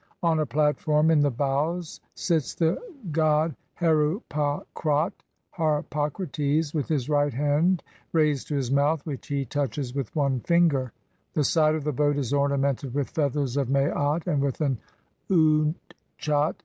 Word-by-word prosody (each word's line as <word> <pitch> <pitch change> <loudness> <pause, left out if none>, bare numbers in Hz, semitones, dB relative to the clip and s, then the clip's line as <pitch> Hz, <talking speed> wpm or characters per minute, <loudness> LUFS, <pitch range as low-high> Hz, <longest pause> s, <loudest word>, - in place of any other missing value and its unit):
On 165 -2 +3
a 155 - 0
platform 150 +3 +2
in 160 - +4
the 145 0 +3
bows 145 +6 -1 0.2
sits 160 -6 -1
the 165 +1 +2 0.4
god 155 0 +2 0.2
Heru 160 +3 +2
pa 145 -1 -1
khrat 150 +1 +1 0.4
(Harpocrates) 150 -1 -1
with 150 -5 -1
his 140 -5 -1
right 145 -1 +2
hand 150 +6 +2 0.3
raised 150 -4 +1
to 150 - -2
his 135 -3 -1
mouth, 145 +2 +2
which 145 -5 -6
he 140 -1 -1
touches 135 -1 -3
with 135 -2 -4
one 140 -4 +1
finger; 145 -5 +2 0.4
the 150 - +1
side 155 +1 +3
of 155 - -3
the 150 0 -1
boat 145 +1 +1
is 140 -2 -2
ornamented 140 -2 0
with 145 -2 -1
feathers 140 -3 -1
of 135 -3 0
Maat 145 +3 +1
and 150 -6 +1
with 140 -2 -1
an 135 -6 0 0.5
Utchat. 155 -2 +1
150 Hz, 150 wpm, -26 LUFS, 140-155 Hz, 0.5 s, in